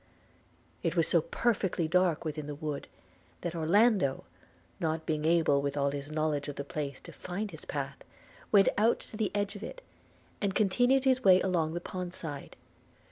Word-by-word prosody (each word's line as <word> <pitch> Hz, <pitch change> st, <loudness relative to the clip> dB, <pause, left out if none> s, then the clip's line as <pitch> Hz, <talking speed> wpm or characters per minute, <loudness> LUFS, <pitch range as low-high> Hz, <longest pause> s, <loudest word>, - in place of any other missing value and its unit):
It -, -, -1 dB
was -, -, +3 dB
so -, -, +4 dB
perfectly 225 Hz, -, 0 dB
dark 175 Hz, -1 st, +2 dB
within 155 Hz, -1 st, -4 dB
the 145 Hz, -, -5 dB
wood, 150 Hz, -1 st, -4 dB, 0.5 s
that 170 Hz, -2 st, -3 dB
Orlando, 175 Hz, -, +3 dB, 0.6 s
not 160 Hz, -1 st, -1 dB
being 155 Hz, -1 st, -1 dB
able 160 Hz, -4 st, +4 dB
with 140 Hz, 0 st, -2 dB
all 140 Hz, 0 st, +2 dB
his 140 Hz, 0 st, -5 dB
knowledge 155 Hz, -2 st, -1 dB
of 145 Hz, -, -5 dB
the 140 Hz, -, -4 dB
place 140 Hz, -1 st, -4 dB
to -, -, -11 dB
find 195 Hz, +3 st, -5 dB
his 160 Hz, -, -11 dB
path, 140 Hz, -1 st, -4 dB, 0.5 s
went 200 Hz, -2 st, +6 dB
out 225 Hz, +3 st, +3 dB
to -, -, -11 dB
the 215 Hz, -2 st, 0 dB
edge 205 Hz, 0 st, -1 dB
of 205 Hz, -, -8 dB
it, -, -, -8 dB, 0.6 s
and 200 Hz, -1 st, 0 dB
continued 245 Hz, +6 st, +3 dB
his 260 Hz, -1 st, +3 dB
way 185 Hz, -3 st, +7 dB
along 170 Hz, -4 st, 0 dB
the 175 Hz, -, -3 dB
pond 180 Hz, 0 st, -5 dB
side. 145 Hz, -4 st, -7 dB
170 Hz, 180 wpm, -30 LUFS, 150-200 Hz, 0.6 s, way